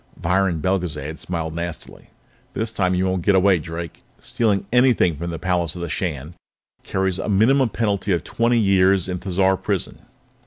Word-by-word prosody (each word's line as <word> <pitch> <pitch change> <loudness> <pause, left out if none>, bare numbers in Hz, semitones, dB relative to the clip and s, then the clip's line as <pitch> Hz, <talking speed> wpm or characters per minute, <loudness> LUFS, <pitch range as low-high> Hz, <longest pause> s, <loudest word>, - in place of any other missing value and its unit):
Viron 90 -1 +1
Belgezad 80 -5 -2
smiled 80 -3 -4
nastily. 85 -1 -7 0.5
"This 110 0 -2
time 90 -4 0
you 90 +1 +1
won't 95 -2 -1
get 100 - +3
away, 95 -1 +4
Drake! 85 +1 -7 0.2
Stealing 100 -4 -1
anything 125 -9 +4
from 85 +4 -5
the 85 - -4
palace 90 -1 -1
of 90 - -5
the 85 - -4
Shan 75 -2 -4 0.5
carries 95 -1 -1
a - - -3
minimum 120 +6 +3
penalty 100 -3 -1
of 85 -4 +1
twenty 115 +1 +1
years 95 -3 +3
in 90 -1 -3
Thizar 95 0 +1
Prison." - - -3
95 Hz, 165 wpm, -21 LUFS, 85-100 Hz, 0.5 s, away